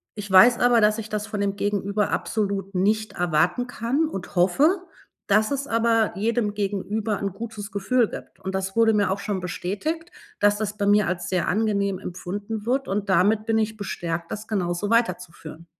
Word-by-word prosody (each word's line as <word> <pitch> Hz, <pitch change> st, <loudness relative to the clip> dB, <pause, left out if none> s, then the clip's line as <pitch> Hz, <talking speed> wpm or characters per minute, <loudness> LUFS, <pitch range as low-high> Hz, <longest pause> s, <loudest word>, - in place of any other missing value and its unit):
ich 205 Hz, -1 st, -6 dB
weiß 235 Hz, +6 st, +7 dB
aber, 240 Hz, -2 st, +4 dB
dass 210 Hz, +1 st, +3 dB
ich 220 Hz, -, -6 dB
das 210 Hz, 0 st, -3 dB
von 210 Hz, -, -4 dB
dem 200 Hz, -1 st, 0 dB
Gegenüber 200 Hz, 0 st, -1 dB
absolut 200 Hz, -2 st, -2 dB
nicht 215 Hz, +4 st, +1 dB
erwarten 175 Hz, +7 st, +1 dB
kann, 250 Hz, +6 st, 0 dB
und 190 Hz, -, -7 dB
hoffe, 290 Hz, -, +3 dB, 0.4 s
dass 215 Hz, +3 st, +3 dB
es 280 Hz, 0 st, -2 dB
aber 230 Hz, -2 st, +2 dB
jedem 220 Hz, 0 st, 0 dB
Gegenüber 205 Hz, +1 st, -2 dB
'n 200 Hz, -1 st, -1 dB
gutes 215 Hz, -1 st, -7 dB
Gefühl 215 Hz, +4 st, +1 dB
gibt. -, -, -10 dB
Und 190 Hz, 0 st, -5 dB
das 190 Hz, 0 st, -3 dB
wurde 225 Hz, -1 st, +4 dB
mir 205 Hz, -2 st, +2 dB
auch 200 Hz, -, -1 dB
schon 200 Hz, -1 st, -2 dB
bestätigt, 305 Hz, -, -4 dB, 0.3 s
dass 205 Hz, 0 st, +3 dB
das 210 Hz, -1 st, -3 dB
bei 200 Hz, -1 st, 0 dB
mir 205 Hz, -1 st, +4 dB
als 175 Hz, 0 st, -3 dB
sehr 180 Hz, -3 st, 0 dB
angenehm 200 Hz, -2 st, 0 dB
empfunden 200 Hz, +4 st, -5 dB
wird, 265 Hz, +3 st, 0 dB
und 200 Hz, +1 st, -2 dB
damit 210 Hz, +4 st, +3 dB
bin 225 Hz, 0 st, +2 dB
ich 220 Hz, 0 st, -1 dB
bestärkt, 170 Hz, -4 st, -4 dB
das 215 Hz, +1 st, -6 dB
genauso 185 Hz, -1 st, -1 dB
weiterzuführen. 180 Hz, -8 st, -1 dB
205 Hz, 180 wpm, -24 LUFS, 190-225 Hz, 0.4 s, weiß